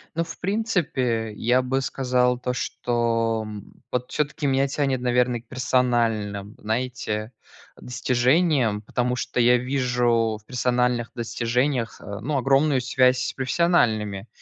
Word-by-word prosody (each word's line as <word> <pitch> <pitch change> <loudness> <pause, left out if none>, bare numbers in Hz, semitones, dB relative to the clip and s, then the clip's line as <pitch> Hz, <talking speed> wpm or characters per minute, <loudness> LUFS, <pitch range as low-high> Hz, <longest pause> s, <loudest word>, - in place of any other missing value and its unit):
Ну, 165 - 0
в - - -10
принципе, 155 - -1
я 125 +4 +2
бы 135 +1 0
сказал, 125 -2 +1
то 125 0 -2
что, 115 -2 -1
м, 105 -1 -10
вот 125 0 -2
всё-таки 150 0 -1
меня 135 0 +2
тянет, 135 -2 -1
наверно, 125 -1 +1
к 120 - -27
персональным, 115 -6 0
знаете, 110 -1 -3 0.5
достижениям, 125 -1 +1
потому 125 +3 -1
что 125 - -2
я 125 +1 +5
вижу 120 -4 +1
в - - -42
персональных 125 -1 0
достижениях, 120 +1 -1
э, 100 0 -7
ну, 140 +7 -2
огромную 135 +1 +3
связь 130 0 +3
с - - -3
профессиональными, 115 - +1
125 Hz, 130 wpm, -24 LUFS, 115-130 Hz, 0.5 s, я